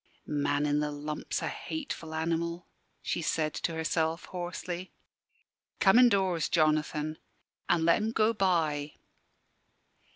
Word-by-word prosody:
"Man 145 0 0
in 145 0 +2
the 150 0 0
lump's 150 +1 -4
a - - -1
hateful 225 - -5
animal," 170 +2 -1 0.4
she - - -1
said 155 -1 0
to 165 - -2
herself, 160 +1 0
hoarsely. 180 0 -5 0.9
"Come 195 +5 +6
indoors, 190 -9 +3
Jonathan, 155 -1 +1 0.5
an' 165 -2 +3
let 170 - +5
'em 220 +1 -1
go 220 0 +3
by." 160 -7 +1
165 Hz, 120 wpm, -30 LUFS, 155-180 Hz, 0.9 s, Come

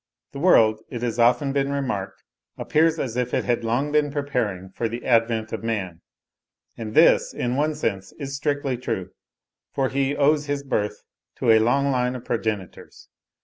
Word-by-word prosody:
The 140 - -7
world, 110 -10 +4
it 120 -1 -6
has 120 -1 -2
often 125 +4 +3
been 140 0 0
remarked, 125 -9 -3 0.3
appears 160 +1 +2
as 125 -7 -3
if 125 -1 -1
it - - 0
had 120 -1 0
long 125 +6 0
been 150 -1 +2
preparing 125 -10 -2
for 115 +4 -2
the 120 +2 -6
advent 115 -2 +1
of - - -4
man: 95 -7 -3 0.7
and 110 -2 -7
this, - - +5
in 125 0 -1
one 150 +2 0
sense 100 -9 -3
is 140 -2 -6
strictly 140 -2 -1
true, 115 -7 -4 0.6
for 135 -1 +1
he 140 +1 0
owes 150 +1 +2
his 145 0 -2
birth 105 -6 -2 0.3
to - - +2
a 110 - +6
long 140 +5 +2
line 125 -1 0
of 125 - -8
progenitors. 110 -5 -4
125 Hz, 175 wpm, -23 LUFS, 110-140 Hz, 0.7 s, a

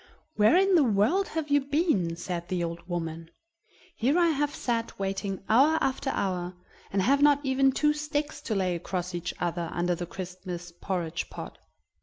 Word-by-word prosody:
"Where 215 +10 +5
in 390 +1 +4
the 330 -5 +6
world 240 - +2
have 320 -2 -3
you 285 0 +5
been?" 275 - +1
said 175 0 -4
the 180 -2 -1
old 170 0 -5
woman. 165 -1 -4 0.7
"Here 275 +4 +2
I 345 -1 +4
have 295 -1 0
sat 230 -2 -2
waiting 195 0 -3
hour 280 +8 +5
after 270 0 -1
hour, 180 -5 -2 0.4
and 195 -1 +1
have 275 +6 +3
not 290 -1 +6
even 270 0 +3
two 300 +3 +2
sticks 300 0 -3
to 215 - +1
lay 185 -2 +1
across 180 +1 -4
each 175 0 -3
other 170 -1 -2
under 175 +1 0
the 175 0 -4
Christmas 180 -1 -7
porridge 175 -1 -3
pot." - - -8
195 Hz, 175 wpm, -28 LUFS, 175-285 Hz, 0.7 s, the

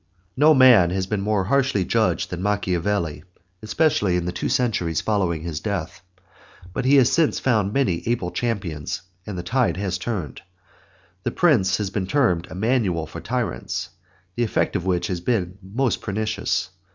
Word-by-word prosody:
No 150 +3 +5
man 125 -9 +7
has 95 +1 -1
been 100 +1 -2
more 105 -1 +1
harshly 130 -3 +1
judged - - 0
than 90 -1 -4
Machiavelli, 95 -5 -1 0.4
especially 110 - +1
in 90 -1 -1
the 90 - -1
two 90 - -3
centuries 95 -10 0
following 90 -7 0
his 80 -3 -4
death. 90 -4 -4 0.7
But 135 - -2
he 135 +2 +5
has 135 -1 +5
since 165 -1 +2
found 110 -6 +1
many 105 -10 +1
able 115 -7 -1
champions 95 -12 -3 0.2
and 100 -3 -5
the 90 - -4
tide 125 +2 +1
has 95 -2 -2
turned. 90 - -4 0.8
The - - -1
Prince 105 - +3
has 100 -3 -3
been 95 -2 -2
termed 95 - +1
a - - -8
manual 100 -6 0
for 80 - -9
tyrants, 115 -7 -3 0.5
the 120 - 0
effect 110 - 0
of 95 -2 -2
which 90 -1 +1
has 90 -1 -3
been 95 -2 -1
most 115 +7 -1
pernicious. 105 -2 -2
100 Hz, 165 wpm, -23 LUFS, 90-120 Hz, 0.8 s, man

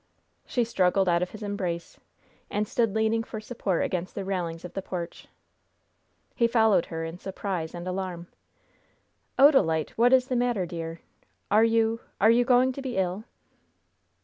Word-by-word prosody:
She 245 - +1
struggled 190 -3 +2
out 170 -1 +3
of 180 - -1
his 215 0 -9
embrace, 185 -5 -4 0.5
and 210 +1 -1
stood 225 -2 0
leaning 220 +1 +2
for 225 -1 -7
support 215 -5 -2
against 180 0 -3
the 195 - -4
railings 175 -3 -3
of 180 - -9
the 195 - -3
porch. 180 -2 -6 1.1
He 235 - +2
followed 220 -6 +3
her 165 -1 -4
in 165 +2 -7
surprise 190 -4 -4
and 175 +1 -6
alarm. 185 -2 -4 1.1
"Odalite! 215 - +4
what 240 +2 +5
is 260 -1 +5
the 255 - -1
matter, 240 -6 +1
dear? 165 -1 -6 0.5
Are 215 +2 +6
you 225 0 +2 0.2
are 220 +3 +6
you 240 +1 +4
going 255 +1 +4
to 275 - -7
be 260 -5 -4
ill?" 190 +3 -1
200 Hz, 160 wpm, -27 LUFS, 175-230 Hz, 1.1 s, Are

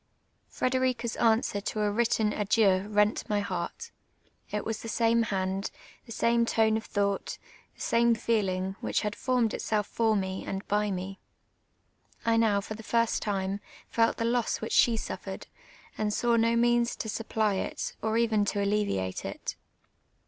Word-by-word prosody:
Frederica's 255 -2 0
answer 220 -3 +2
to 215 - -3
a 210 -1 +2
A\Titten 220 -1 +2
adieu 200 -2 +2
rent 210 0 +2
n 210 - +1
y - - +2
heart. 200 - -4 0.6
It 210 - -3
was 220 -1 -3
the 225 - -6
same 230 +1 +3
hand, 195 -2 -1 0.4
the - - -10
same 235 +1 +2
tone 220 -1 +3
of 220 - -3
thought, 200 -1 -1 0.4
the - - -14
same 235 0 +3
feel 220 -3 +1
ing, 185 +1 -3
which - - 0
had 210 -1 -2
formed 250 -4 +1
itself 215 +1 -2
I'or 220 -1 +4
me 190 -1 -2
and 195 0 -5
by 210 0 +1
me. 190 0 -4 1.1
I 230 0 +3
now, 220 -3 +3
for 215 - -6
the 220 - -9
first 230 +1 +1
time, 195 -1 -1 0.3
felt 230 0 +2
the 230 - -1
loss 235 0 +1
which 220 - -4
she 230 -2 +5
suffered, - - -6 0.5
and 215 -1 +1
saw 235 +2 +2
no 230 0 +3
means 240 0 +3
to - - -5
supply 220 -1 0
it, - - -3
or 220 +1 0
even 225 -3 +3
to 205 0 0
alleviate 200 - -1
it. - - -5
220 Hz, 170 wpm, -28 LUFS, 200-230 Hz, 1.1 s, she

